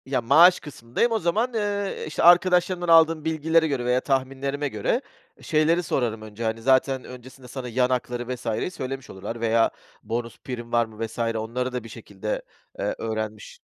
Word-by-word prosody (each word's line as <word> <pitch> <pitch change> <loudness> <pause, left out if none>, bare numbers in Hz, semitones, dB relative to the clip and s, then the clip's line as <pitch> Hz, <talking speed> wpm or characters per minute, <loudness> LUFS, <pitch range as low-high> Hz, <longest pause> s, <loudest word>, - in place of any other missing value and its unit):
Ya, 135 -2 0
maaş 160 +10 +6
kısmındayım, 145 - -2
o 225 - +1
zaman, 215 +8 0
eee, 205 -2 -2
işte 155 - -2
arkadaşlarımdan 175 +1 +4
aldığım 165 -1 +5
bilgilere 160 +1 +2
göre 135 -5 -2
veya 125 +1 +2
tahminlerime 135 +1 -1
göre 110 -6 -1 0.4
şeyleri 160 +3 +2
sorarım 115 -8 -1
önce, 110 +1 -8
hani, 115 0 -2
zaten 130 +1 +2
öncesinde 125 +1 -12
sana 125 0 -6
yan 125 +2 +1
hakları 125 0 -2
vs.yi 115 +7 -3
söylemiş 135 -3 -6
olurlar 115 +5 -7
veya 115 0 +3 0.3
bonus 115 +1 -4
prim 120 -2 -7
var 120 0 +3
mı 110 0 -6
vs. 110 +1 -10
onları 115 +2 -2
da 125 -2 -3
bir 115 - -10
şekilde, 105 -2 -5 0.4
eee, - - -1
öğrenmiş 110 -1 -5
130 Hz, 165 wpm, -24 LUFS, 115-160 Hz, 0.4 s, maaş